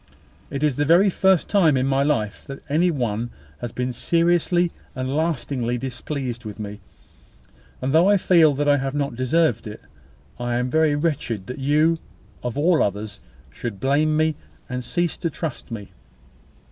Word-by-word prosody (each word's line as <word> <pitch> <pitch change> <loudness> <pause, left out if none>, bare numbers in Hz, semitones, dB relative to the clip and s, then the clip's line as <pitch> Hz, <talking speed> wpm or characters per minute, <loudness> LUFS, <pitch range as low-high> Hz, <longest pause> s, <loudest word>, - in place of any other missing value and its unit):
It 140 +1 -3
is 150 -4 +1
the 170 +7 +5
first 190 -2 +3
time 165 -9 +4
in 130 - +1
my 135 0 +2
life 140 -8 -1
that 135 -1 -8
any 160 +5 +2
one 120 -6 -1 0.3
has 120 -2 -5
been 125 +1 -3
seriously 175 +4 +2 0.2
and 130 +1 -2
lastingly 140 -6 -1
displeased 125 0 -4
with 105 -1 -8
me; 105 -1 -6 1.0
and, 135 +2 0
though 170 +5 +5
I 205 - +5
feel 165 -6 +4
that 145 +1 0
I 145 0 +5
have 135 +1 -3
not 140 -3 -1
deserved 130 -2 +1
it, 105 - -8 0.6
I 120 0 -1
am 125 +1 -1
very 160 -2 +3
wretched 145 - -2
that 125 +4 -7
you, 150 +4 +3 0.4
of 125 +1 -4
all 165 +3 +3
others, 105 +1 -2 0.3
should 110 - -6
blame 150 +5 +2
me, 155 0 +2 0.3
and 125 0 -4
cease 175 +5 -1
to 170 - -2
trust 155 -5 -5
me. 105 -4 -7
140 Hz, 165 wpm, -23 LUFS, 120-160 Hz, 1.0 s, the